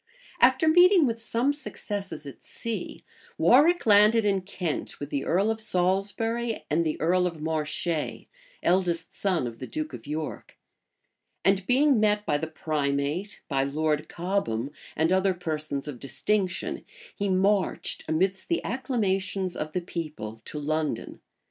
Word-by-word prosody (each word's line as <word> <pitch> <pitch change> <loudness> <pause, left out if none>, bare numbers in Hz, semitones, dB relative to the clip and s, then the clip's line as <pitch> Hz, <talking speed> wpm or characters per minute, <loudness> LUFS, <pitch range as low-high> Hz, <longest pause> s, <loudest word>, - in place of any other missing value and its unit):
} - - -19
After 260 +5 +5
meeting 355 +1 +7
with 230 -2 -1
some 235 +5 +1
successes 205 - -6
at 140 - -10
sea, 230 -2 -5 0.3
Warwick 320 +7 +5
landed 210 +1 +6
in 195 -2 +2
Kent, 180 -4 -4
with 145 0 -6
the 140 -1 -1
earl 195 +5 +2
of 220 0 -3
Salisbury, 215 +4 0
and 165 +3 +3
the 155 -2 -2
earl 180 +3 +3
of 165 -3 -6
Marche, 155 +1 -2 0.4
eldest 175 -2 +1
son 185 -9 0
of 115 -1 -6
the 130 - -6
duke 155 +5 -4
of 120 +1 -9
York; 155 +1 -5 0.9
and 195 -1 +3
being 270 0 +4
met 210 -1 +2
by 145 - +1
the 160 - -3
primate, 150 +5 -2
by 135 -2 +1
Lord 150 +2 -1
Cobham, 170 - -2 0.2
and 160 +2 +2
other 190 0 +2
persons 155 -4 -3
of 135 -5 -6
distinction, 190 +6 -1 0.3
he 200 0 -1
marched, 195 +1 +1
amidst 190 +4 0
the 340 - 0
acclamations 195 -7 -1
of 155 0 -4
the 180 - 0
people, 150 -11 -6
to - - -6
London. 155 +1 -2
185 Hz, 150 wpm, -27 LUFS, 155-210 Hz, 0.9 s, meeting